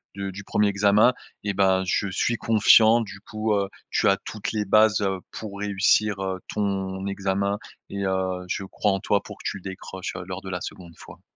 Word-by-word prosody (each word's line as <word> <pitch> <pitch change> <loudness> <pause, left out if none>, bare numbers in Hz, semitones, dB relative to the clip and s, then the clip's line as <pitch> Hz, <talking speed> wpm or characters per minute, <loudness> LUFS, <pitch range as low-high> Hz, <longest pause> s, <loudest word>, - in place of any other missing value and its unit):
du 100 -1 -4
du 100 +2 -8
1er 105 0 +2
examen 100 +4 +4 0.3
et 100 -1 -1
bah, 95 -1 +3
je 100 +2 0
suis 110 +4 0
confiant, 110 +1 +5
du 100 -3 -7
coup, 110 +1 -2
heu, 100 -1 +1 0.2
tu - - +2
as 100 - +5
toutes 105 -2 -4
les 105 -1 0
bases, 110 0 +4
heu, 95 -1 0
pour 100 -2 -7
réussir, 100 0 +2
heu, 95 -1 -3
ton 95 -2 -2
examen 100 +1 -1 0.3
et 100 0 -3
heu, 95 -1 -1
je - - -2
crois 105 +2 0
en 95 - -1
toi 100 -1 +1
pour - - -10
que - - -13
tu - - -5
le 95 - -14
décroches, 95 -1 -6
heu, 90 - -5
lors 95 +1 -6
de 95 - -8
la 90 -1 -4
2de 85 -3 -8
fois. - - -13
100 Hz, 210 wpm, -25 LUFS, 95-105 Hz, 0.3 s, confiant